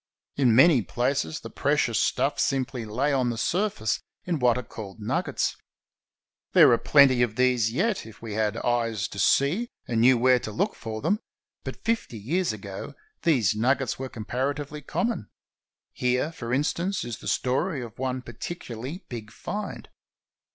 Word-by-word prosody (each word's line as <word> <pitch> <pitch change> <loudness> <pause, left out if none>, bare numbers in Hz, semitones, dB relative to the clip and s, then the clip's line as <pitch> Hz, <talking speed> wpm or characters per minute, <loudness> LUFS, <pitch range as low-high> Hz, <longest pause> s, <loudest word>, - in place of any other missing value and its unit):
In 125 -5 +4
many 135 0 +7
places 120 - -1
the - - -9
precious - - +1
stuff - - +1
simply 130 -3 0
lay 130 +7 0
on 130 -3 +2
the 120 - -3
surface 175 - 0 0.3
in 170 -4 -1
what 125 -1 +3
are 125 - -3
called 110 -2 -9
nuggets. 105 - -1 1.0
There - - +8
are 115 - +4
plenty 135 -4 +5
of 115 -3 +1
these 125 -3 +2
yet, 190 - 0
if 110 - -13
we 115 -2 -6
had 110 0 0
eyes 115 -4 0
to 100 - -7
see, 170 - +2 0.2
and 115 -2 +1
knew 125 +1 +6
where 125 +1 +4
to 110 - -6
look 200 - 0
for 110 -2 -6
them, 200 +7 +2 0.4
but - - -7
fifty 225 - -1
years 160 - 0
ago 100 -2 -7 0.3
these 125 - +3
nuggets 130 +5 +1
were 130 0 -4
comparatively 140 +6 -3
common. 160 - -2 0.6
Here, 125 +5 0
for 120 -7 -6
instance, 170 +8 0
is 120 -2 -5
the - - -9
story 135 +3 0
of 115 -2 -10
one 130 -1 -2
particularly 125 - -7
big 110 -3 -7
find. 205 - -5
125 Hz, 160 wpm, -26 LUFS, 115-145 Hz, 1.0 s, There